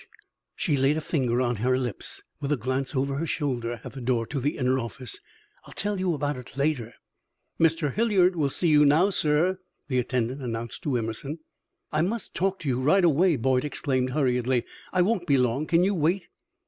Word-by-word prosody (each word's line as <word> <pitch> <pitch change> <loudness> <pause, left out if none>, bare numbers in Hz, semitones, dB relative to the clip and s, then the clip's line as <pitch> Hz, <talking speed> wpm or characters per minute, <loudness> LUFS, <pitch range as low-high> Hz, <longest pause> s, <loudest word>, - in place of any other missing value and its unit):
She 150 -5 0
laid 135 +3 +3
a - - +1
finger 130 -6 0
on 120 -2 0
her 130 +4 +2
lips, 125 -5 -5 0.2
with 145 -1 -3
a 150 - +2
glance 130 +4 -2
over 135 +1 0
her 165 +3 -2
shoulder 120 -7 -2
at - - -8
the 135 - -7
door 120 -2 0
to 140 +4 -3
the 145 +4 -1
inner 130 0 +1
office. 115 0 -6 0.5
"I'll - - -13
tell 205 -1 -1
you 185 -3 +1
about 145 -1 -2
it 125 +1 -11
later." 140 -6 0 0.7
"Mr. 160 -4 +2
Hilliard 195 -5 +3
will 150 -4 +1
see 170 +5 0
you 150 -1 +6
now, 160 +8 +4
sir," 170 +2 +2 0.3
the 130 -2 +2
attendant 125 +2 -1
announced 115 -2 -5
to 135 -5 +1
Emerson. 115 +7 -4 0.5
"I 155 - +1
must 210 +6 -2
talk 190 +1 0
to 155 - -6
you 130 -1 0
right 175 +8 +4
away!" 170 +2 +4
Boyd 130 +1 +1
exclaimed, 130 -3 -1
hurriedly. 125 -3 +1 0.3
"I 180 -1 +3
won't 190 -3 0
be 140 -2 +4
long. 125 +4 +1
Can 170 +1 +4
you 200 +2 +2
wait?" 175 +2 0
140 Hz, 200 wpm, -26 LUFS, 125-165 Hz, 0.7 s, you